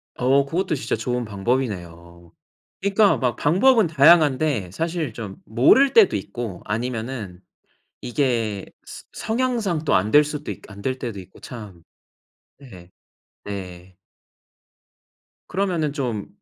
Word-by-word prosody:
어 135 +2 +2
그것도 165 +3 -1
진짜 130 - -2
좋은 120 +2 -2
방법이네요. 90 -7 -4 0.5
그러니까 200 +1 +3
막 125 -3 0
방법은 205 - +4
다양한데 145 - +4
사실 160 - -3
좀 105 -4 -7
모를 200 - +4
때도 215 - +6
있고 100 -1 -5
아니면 110 -4 -4 0.6
이게 115 -6 -1 0.2
스 - - -11
성향상 220 -9 -1
또 - - +2
안 100 +2 +2
될 150 0 +6
수도 150 0 -5
있 - - -7
안 100 0 -11
될 130 0 -2
때도 115 -7 -5
있고 95 +1 -16
참. 105 -8 -10 0.8
네. 95 -11 -14 0.5
네. 90 -2 -8 1.5
그러면은 175 -6 -1
좀 120 -7 -3
125 Hz, 230 characters per minute, -22 LUFS, 100-155 Hz, 1.5 s, 때도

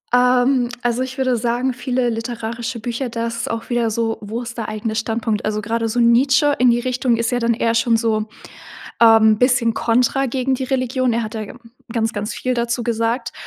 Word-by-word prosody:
Ähm, 250 0 +3
also 240 +1 0
ich 260 +1 -4
würde 255 -2 +1
sagen 240 +3 -1
viele 250 0 -1
literarische 230 +1 -4
Bücher, 240 +2 -3
da 230 0 -3
ist 235 0 -4
auch 230 +2 -5
wieder 240 -1 +1
so: 225 0 -2
Wo 220 +4 -5
ist 235 0 -8
der 225 - -4
eigene 215 +1 -3
Standpunkt. 220 -1 -2
Also 215 0 -1
gerade 225 +2 -2
so 240 - -1
„Nietzsche“ 260 +5 +4
in 250 0 +5
die 240 0 +2
Richtung 250 -1 0
ist 230 0 -1
ja 245 - 0
dann 230 -1 +1
eher 230 0 0
schon 230 0 +2
so, 220 -1 0 0.7
ähm, 220 -2 +6
bisschen 245 -2 +3
Kontra 250 +4 +1
gegen 260 +1 -1
die 260 0 -3
Religion. 255 -1 0
Er 235 - 0
hat 215 0 -6
da 215 -1 -4 0.4
ganz 225 -1 -1
ganz 210 +1 -4
viel 255 - -2
dazu 235 0 -1
gesagt. 230 +1 -1
235 Hz, 200 wpm, -19 LUFS, 225-250 Hz, 0.7 s, ähm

